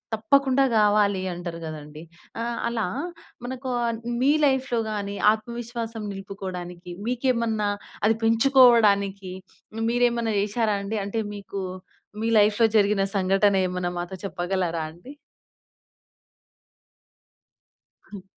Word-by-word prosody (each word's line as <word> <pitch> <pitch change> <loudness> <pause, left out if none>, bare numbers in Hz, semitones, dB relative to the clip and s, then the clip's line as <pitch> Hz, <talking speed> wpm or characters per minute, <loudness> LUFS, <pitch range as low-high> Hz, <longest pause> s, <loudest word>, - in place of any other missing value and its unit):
తప్పకుండా 275 +4 +3
గావాలి 205 -2 +3
అంటారు 175 -1 -6
గదండీ! 155 0 -8 0.4
ఆహ్, 235 0 -3
అలా 230 -2 -1 0.6
మన‌కొ 260 +1 -5 0.2
ఆహ్, 230 -1 -2 0.2
మీ 275 +2 +4
లైఫ్‌లో 265 -3 +1
గానీ 200 -1 -3 0.2
ఆత్మవిశ్వాసం 230 0 -6
నిలుపుకోడానికి, 185 -3 -7 0.2
మీకేమన్నా 235 -4 0 0.4
అది 220 +1 +3
పెంచుకోవడానికి 225 -6 +4 0.4
హ్మ్, 225 - -2
మిరెమన్న 235 -2 +1
జేశారా 210 +1 0
అండి? 210 +2 -2
అంటే 220 +3 -2
మీకు, 200 -1 -6 0.6
మీ 225 - 0
లైఫ్‌లో 210 +2 +4
జరిగిన 200 -1 +3
సంఘటనేమన్నా 185 -2 +1
మాతో 175 +2 -5
చెప్పగలరా 175 -3 -2
అండి? 180 - -13 3.0
హ్మ్. 200 -3 -9
210 Hz, 100 wpm, -25 LUFS, 190-235 Hz, 3.0 s, మీ